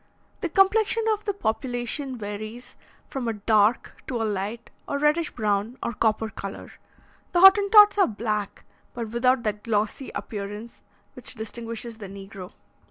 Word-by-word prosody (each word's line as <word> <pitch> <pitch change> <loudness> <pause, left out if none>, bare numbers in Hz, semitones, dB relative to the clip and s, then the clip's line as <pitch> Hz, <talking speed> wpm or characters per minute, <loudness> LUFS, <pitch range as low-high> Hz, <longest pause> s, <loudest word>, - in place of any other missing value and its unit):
The 350 - -2
complexion 425 +5 +3
of 420 0 -6
the 405 - 0
population 250 - -3
varies 215 +3 -7 0.3
from 260 -3 -4
a 230 - 0
dark 215 +1 +1
to 245 - -2
a 225 - 0
light 210 +3 -4 0.2
or 285 - -1
reddish 300 +3 +2
brown 215 +2 -1
or 235 - -2
copper 220 0 +1
colour. 195 0 -7 0.6
The 350 - +3
Hottentots 410 +2 +8
are 390 - +6
black, 210 -2 -3 0.3
but 230 -2 -4
without 245 +2 +2
that 210 -1 -2
glossy 215 +4 -1
appearance 210 +1 -6 0.3
which - - -6
distinguishes 230 +1 -6
the 205 - -7
negro. 195 -1 -10
230 Hz, 145 wpm, -25 LUFS, 210-270 Hz, 0.6 s, Hottentots